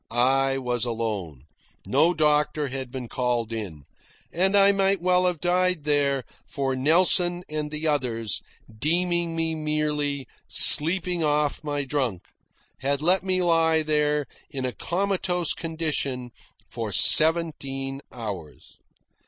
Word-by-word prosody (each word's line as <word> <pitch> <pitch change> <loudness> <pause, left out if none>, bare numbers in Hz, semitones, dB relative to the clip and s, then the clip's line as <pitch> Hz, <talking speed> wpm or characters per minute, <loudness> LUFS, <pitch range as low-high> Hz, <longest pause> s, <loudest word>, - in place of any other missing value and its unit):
I 135 +3 +2
was 125 -3 -2
alone. 105 - -4 0.4
No 170 - +3
doctor 150 -1 +1
had 130 -1 -6
been 125 -1 -6
called 120 -2 -2
in. 95 -10 -6 0.5
And 190 +3 +2
I 200 0 +6
might 195 -1 +1
well 180 +1 +2
have 175 -3 -1
died 180 -1 +1
there, 140 -2 +1 0.2
for 135 -2 -2
Nelson 175 +5 +3
and 150 -1 -4
the 155 +1 -5
others, 120 -8 -1 0.3
deeming 170 +5 0
me 165 0 -1
merely 150 -3 -2 0.2
"sleeping 175 +2 +4
off 150 0 0
my 145 -1 -2
drunk," 130 -10 -2 0.6
had 140 +2 -1
let 180 +2 +3
me 185 0 0
lie 165 -2 +3
there 150 -1 +1 0.2
in 135 -3 -4
a 125 - -1
comatose 180 - -1
condition 150 -6 -3 0.4
for 115 -3 -5
seventeen 140 - +2
hours. 100 - -8
150 Hz, 125 wpm, -25 LUFS, 130-170 Hz, 0.6 s, I